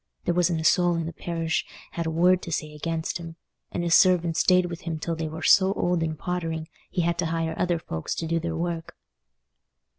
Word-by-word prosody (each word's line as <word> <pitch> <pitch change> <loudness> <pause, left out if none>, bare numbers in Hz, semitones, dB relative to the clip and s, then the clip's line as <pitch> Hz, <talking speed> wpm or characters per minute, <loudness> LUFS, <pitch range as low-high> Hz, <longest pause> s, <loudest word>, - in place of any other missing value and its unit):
There 175 - +2
wasn't 175 -1 +2
a - - -3
soul 175 +2 +4
in 165 -1 -2
the 165 - -5
parish 165 0 -2 0.3
had 170 -1 -3
a - - +1
word 180 +3 +3
to 170 - -7
say 155 -1 -2
against 165 +2 -3
him; 165 -1 -8 0.4
and 175 - -2
his 170 -1 +1
servants 175 -3 +4
stayed 180 -1 +4
with 175 0 -6
him 165 -3 -3
till 165 +2 -3
they 160 -1 -3
were 160 +1 -7
so 195 0 +5
old 175 -3 0
and 160 -1 -2
pottering, 165 -2 -3 0.2
he 175 - -1
had 170 0 0
to 170 - +1
hire 165 0 -1
other 175 -1 +1
folks 80 - -4
to 165 - -3
do 165 +1 0
their 165 0 -3
work." 170 -1 -4
165 Hz, 220 wpm, -26 LUFS, 160-175 Hz, 0.4 s, so